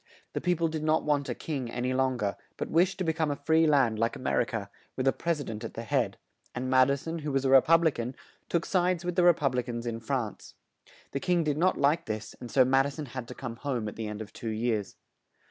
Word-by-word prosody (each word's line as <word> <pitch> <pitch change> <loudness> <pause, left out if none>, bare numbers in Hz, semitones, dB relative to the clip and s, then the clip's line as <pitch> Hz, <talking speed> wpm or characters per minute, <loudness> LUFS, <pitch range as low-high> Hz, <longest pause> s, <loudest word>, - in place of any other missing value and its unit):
The - - -2
peo 180 -1 +2
ple 165 0 +1
did 155 -1 -4
not 155 +1 +2
want 145 -2 0
a - - -2
king 135 -7 -4
an 120 +1 -4
y 125 - 0
long 130 -3 +1
er, 100 -1 0 0.2
but - - -4
wished 175 +3 +3
to 190 - -1
be 160 -2 +1
come 160 -1 0
a 145 - 0
free 160 +3 +3
land 130 -7 +3
like 115 +1 +1
A - - -8
mer 130 - +1
i - - +1
ca, 110 -3 -4 0.3
with 130 0 -1
a 135 - +4
pres 170 -2 -1
i - - -3
dent 110 -3 -6
at 115 - -6
the 115 - -4
head; 110 - 0 0.4
and 130 +1 -2
Mad 130 0 +6
i 140 - +3
son, 165 +4 -5
who 150 -1 -3
was 135 0 0
a 135 - +3
Re 135 -1 +9
pub 165 +3 +4
li 160 - +4
can, 125 0 -5 0.3
took 170 -1 0
sides 180 -2 +1
with 180 -1 -2
the 180 - +4
Re 175 0 +8
pub 140 -5 0
li 125 - +1
cans 120 -1 -5
in 115 -1 -3
France. 115 -3 -4 0.6
The 140 - -2
king 175 +1 +1
did 150 -1 0
not 185 +2 +3
like 150 +4 +2
this, 110 -1 -4
and 120 - -8
so 130 +2 +5
Mad 135 +2 +4
i - - -3
son 145 +1 -6
had 130 -2 -7
to - - -8
come 115 -3 -6
home 125 -5 -2
at 105 - -6
the 110 -1 -4
end 105 +1 -5
of 105 - -15
two 115 - -5
years. 110 -2 -1
135 Hz, 290 wpm, -29 LUFS, 120-160 Hz, 0.6 s, Re